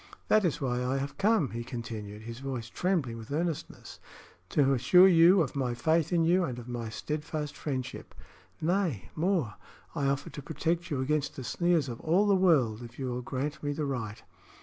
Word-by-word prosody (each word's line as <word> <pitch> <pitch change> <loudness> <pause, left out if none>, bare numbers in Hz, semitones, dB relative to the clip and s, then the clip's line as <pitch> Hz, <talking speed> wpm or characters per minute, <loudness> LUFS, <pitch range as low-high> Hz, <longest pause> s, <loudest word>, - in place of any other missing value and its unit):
"That 215 -1 +5
is 165 -4 0
why 125 -3 -1
I 130 +2 0
have 140 +1 -4
come," 210 - +3
he 120 +1 -4
continued, 110 -4 -7
his 115 +1 -7
voice 130 -4 -5
trembling 155 -11 -1
with 115 +4 -10
earnestness, 160 +1 -4 0.5
"to 140 -2 +3
assure 180 +9 +6
you 175 +1 +6
of 140 - -6
my 125 -3 -1
faith 160 +5 +1
in 170 -2 +3
you 180 +3 +3
and 125 -7 -3
of 120 -1 -9
my 120 -2 -4
steadfast 150 +5 -4
friendship. 130 -4 -5 0.4
Nay, 160 - -1
more; 165 - 0 0.4
I 145 -4 0
offer 140 0 -1
to 145 - -7
protect 165 +4 -2
you 140 -3 -1
against 150 +2 -1
the 130 - -6
sneers 170 +1 +1
of 120 -2 -6
all 180 +6 +3
the 205 - +4
world, 145 - +3
if 120 0 -10
you 130 -2 -3
will 125 +1 -3
grant 135 +4 -4
me 145 -1 -1
the 150 0 -2
right." 115 -6 -4
140 Hz, 195 wpm, -29 LUFS, 125-165 Hz, 0.5 s, assure